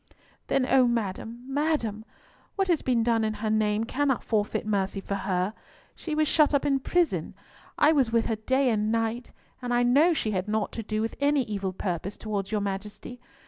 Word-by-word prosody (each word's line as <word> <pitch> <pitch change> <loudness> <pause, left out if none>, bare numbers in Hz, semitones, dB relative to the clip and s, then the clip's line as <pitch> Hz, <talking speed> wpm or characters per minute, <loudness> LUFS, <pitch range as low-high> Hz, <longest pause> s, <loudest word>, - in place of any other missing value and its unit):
"Then, 270 - +2
O 255 -1 +4
madam, 230 +1 -3
madam, 270 -7 -1 0.5
what 390 -1 0
has 335 -4 +3
been 240 -3 +1
done 230 -1 +2
in 215 0 -1
her 215 +1 -2
name 215 0 +1
cannot 265 +2 0
forfeit 210 -2 -1
mercy 200 -2 -1
for 195 - -5
her! 190 0 -1 0.4
She 315 -3 -4
was 310 0 +2
shut 300 0 +4
up 280 - +1
in 275 -2 +2
prison; 345 +5 0 0.4
I 300 - +5
was 270 -7 +2
with 230 -1 +2
her 225 - 0
day 260 +4 +1
and 215 0 0
night, 230 +1 -1 0.3
and 245 -1 -4
I 240 0 +3
know 290 +8 +4
she 220 -7 -1
had 185 0 -2
naught 215 0 -1
to 230 - -5
do 215 0 -2
with 225 - -3
any 285 -1 +3
evil 200 -4 -3
purpose 185 +1 -4
towards 205 -2 -4
your 210 -1 0
Majesty. 205 +5 -5
225 Hz, 195 wpm, -27 LUFS, 210-270 Hz, 0.5 s, I